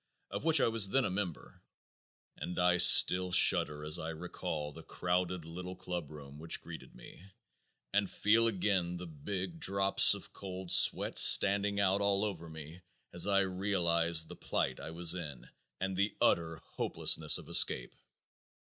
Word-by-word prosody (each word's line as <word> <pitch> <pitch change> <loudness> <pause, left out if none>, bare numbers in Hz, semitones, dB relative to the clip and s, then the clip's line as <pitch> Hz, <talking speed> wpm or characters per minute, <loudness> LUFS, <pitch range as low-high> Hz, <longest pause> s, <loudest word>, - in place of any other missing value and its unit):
of - - -7
which 160 0 +2
I - - +1
was 110 -4 +1
then 135 +4 -1
a - - -4
member, 95 -4 -7 0.7
and 90 - -8
I 90 0 +1
still 90 +1 +6
shudder 85 -4 +4
as 75 - -3
I 80 - -7
recall 80 -2 -7
the - - -13
crowded 90 -1 -4
little 90 +3 -10
club 90 -4 -8
room 75 -1 -13
which 80 +1 -2
greeted - - -13
me, 60 - -16 0.7
and 100 -1 -1
feel 115 +2 0
again 95 -4 -3
the 90 - -9
big 85 +2 -8
drops 100 0 +2
of - - -14
cold 95 -2 -9
sweat - - +4
standing 100 +1 +5
out 100 0 0
all 100 +1 -1
over 85 -5 -8
me 80 +2 -12 0.3
as 85 +2 -4
I 100 -1 +1
realized 85 -4 -2
the - - -12
plight 65 -1 -4
I - - -10
was 85 +1 0
in 70 -9 -9 0.3
and 95 0 -4
the 100 +3 -2
utter 80 -1 -1
hopelessness - - +1
of - - -13
escape. - - +3
90 Hz, 160 wpm, -30 LUFS, 80-100 Hz, 0.7 s, still